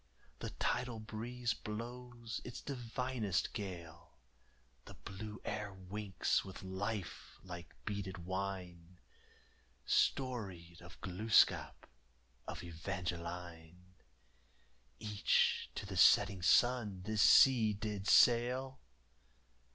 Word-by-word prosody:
The - - -4
tidal 120 -3 -1
breeze 120 +3 -3
blows 120 +1 -6
its 125 - -7
divinest 125 -6 -2
gale! 85 -6 -7 0.7
The - - -11
blue 105 +3 -8
air 105 -1 -3
winks 95 +1 -1
with 95 0 -9
life 100 +1 -5
like 85 -4 -9
beaded 100 -4 -4
wine! 90 -2 -5 0.9
Storied 95 -11 0
of - - -13
Glooscap, 105 +4 +2 0.6
of - - -6
Evangeline 85 0 -6 1.1
Each 105 -1 +1
to - - -4
the - - -6
setting 95 -2 +6
sun 105 -2 +3
this 110 +1 0
sea 120 -3 +7
did 105 -1 -4
sail. 125 +2 +4
100 Hz, 90 wpm, -36 LUFS, 90-115 Hz, 1.1 s, sea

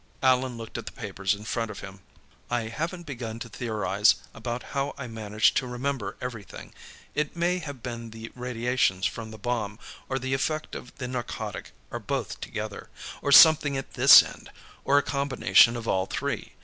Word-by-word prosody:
Allan 130 -1 +3
looked 115 -1 -6
at - - -9
the - - -4
papers 100 -2 -2
in 105 - -11
front 115 0 -2
of 105 - -8
him. 95 0 -10 0.5
"I 120 -2 -1
haven't 170 +8 -4
begun 120 -6 -5
to 115 0 -7
theorize 105 -2 +2 0.2
about 120 +2 -4
how 140 0 -1
I 140 - -5
managed 110 -2 +1
to 130 - 0
remember 125 -3 -3
everything. 115 -8 -8 0.4
It 150 +1 -1
may 175 +2 +1
have 145 -7 -8
been 115 -2 -5
the 115 +1 -9
radiations 125 -6 0
from 115 -1 -3
the 110 - -10
bomb, 110 -2 -2 0.3
or 135 - 0
the 130 0 -2
effect 155 +3 -1
of 125 - -9
the 130 -3 -4
narcotic, 120 -5 -5 0.2
or - - -4
both - - -4
together, - - -6 0.3
or 140 - -1
something 150 -2 +8
at 135 - -6
this - - +9
end, - - -11 0.3
or 140 - +4
a 145 - +4
combination 140 -4 +4
of 115 -1 -6
all 95 0 +1
three. - - -3
120 Hz, 180 wpm, -27 LUFS, 110-135 Hz, 0.5 s, this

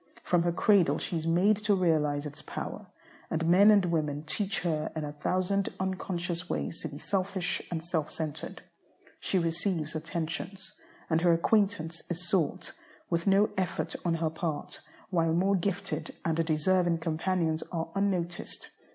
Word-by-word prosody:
From 175 -1 +3
her 175 0 +2
cradle 170 -5 +4
she - - -3
is 165 0 -2
made 185 +5 +4
to 210 -1 +2
realize 155 -5 +2
its 145 -1 -6
power, - - -6 0.4
and 165 +1 -1
men 185 +5 +7
and 205 -3 +6
women 155 -4 -1
teach 195 +5 0
her 160 -3 -1
in 155 - -2
a 145 - -4
thousand 185 +6 0
unconscious 180 -2 -2
ways 165 - -3
to - - -3
be 145 -2 -8
selfish 190 +1 -1
and 165 -2 -3
self 160 -3 -1
centred. 155 -2 -5 0.6
She 190 - 0
receives 165 -1 0
attentions, 165 +4 -4 0.3
and 160 -1 +2
her 175 -1 +5
acquaintance 170 -3 +1
is 175 +1 -3
sought, 170 -4 0 0.4
with 170 +2 0
no 200 +2 +5
effort 185 - -1
on 170 -2 +1
her 160 -1 0
part, 160 -2 -4 0.3
while 165 -3 +2
more 190 +4 +3
gifted 180 -4 -2
and 165 0 +2
deserving 170 +2 +2
companions 165 0 0
are 165 -1 -3
unnoticed. 185 -3 -2
170 Hz, 155 wpm, -30 LUFS, 160-185 Hz, 0.6 s, men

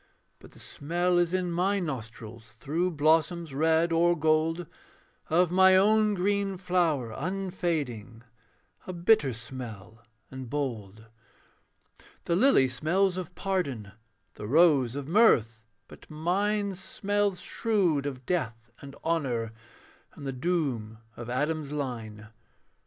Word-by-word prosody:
But - - -16
the - - -15
smell 175 +4 -1
is 175 -1 +1
in 185 -1 -1
my 190 +4 +1
nostrils, 115 - -7
Through 155 +10 -1
blossoms 160 +1 +1
red 160 +3 +2
or 170 +1 +3
gold, 160 +2 +1 0.6
Of 175 +2 +3
my 190 +1 +6
own 215 +1 +3
green 200 +1 0
flower 170 -10 0
unfading, 155 - -3 0.6
A 185 - -4
bitter 170 -5 +3
smell 115 -2 -9 0.3
and 130 -2 -8
bold. 110 -7 -4 1.2
The 170 - +1
lily 195 - +5
smells 175 +9 +1
of 185 -3 -6
pardon, 140 - -2 0.4
The 105 - -8
rose 140 -3 +4
of 140 -1 -5
mirth; 115 - +3 0.2
but - - -15
mine 200 +6 0
Smells 200 +1 -1
shrewd 180 -11 0
of 130 -2 -7
death 120 -10 -3
and 140 -1 -10
honour, 125 -9 -1 0.6
And 140 - -10
the 135 - -3
doom 130 -7 -2 0.2
of 120 0 -8
Adam's 150 +3 -2
line. 115 -7 -5
155 Hz, 120 wpm, -28 LUFS, 125-180 Hz, 1.2 s, my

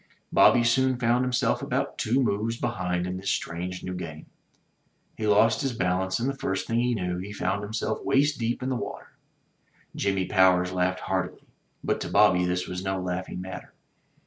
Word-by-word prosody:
Bobby 120 - +6
soon 130 +2 +2
found 120 +1 +2
himself 125 -1 +1
about - - -2
two 130 +5 +2
moves 115 +1 -1
behind 90 -8 -2
in 90 0 -3
this 95 +1 -3
strange 90 +2 -3
new 90 - -4
game. 80 -4 -7 0.9
He 110 - -3
lost 105 +2 +4
his 135 -3 -1
balance, 95 -1 0
and 120 - -1
the 140 - -1
first 95 -7 -2
thing 115 +1 0
he 120 0 +1
knew, 90 -3 -2
he 100 +3 -6
found 100 0 -1
himself 110 +1 -3
waist 145 +1 +2
deep 120 +2 -1
in 130 - -1
the 130 - 0
water. - - -6 0.8
Jimmy 95 -1 0
Powers 90 -1 +4
laughed 90 0 0
heartily; 95 -1 -3 0.4
but - - -1
to - - -3
Bobby 90 0 +4
this 90 0 -1
was 90 +1 -5
no 95 0 -1
laughing 90 0 -4
matter. 90 -1 -8
95 Hz, 180 wpm, -26 LUFS, 90-120 Hz, 0.9 s, Bobby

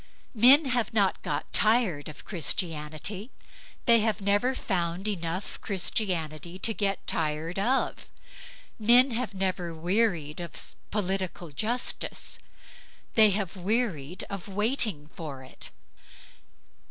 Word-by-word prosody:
Men 260 +7 +7
have 240 -4 0
not 200 -3 +2
got 145 0 -3
tired 215 - +2
of 150 - -11
Christianity; 170 - -2 0.6
they 235 -2 +6
have 220 0 +1
never 205 +6 +2
found 180 -2 -2
enough 185 -1 -3
Christianity 175 -4 -2
to 225 +4 +2
get 195 0 -1
tired 160 +3 -2
of. 250 +7 0 0.7
Men 245 +4 +6
have 230 -3 -2
never 185 -3 -2
wearied 175 -3 0
of 170 -2 -5
political 185 -4 -2
justice; 225 - -2 0.7
they 220 -1 +7
have 200 -1 -2
wearied 185 - -1
of 200 -1 -6
waiting 210 - +1
for 145 -6 -7
it. 130 - -9
195 Hz, 110 wpm, -28 LUFS, 165-220 Hz, 0.7 s, Men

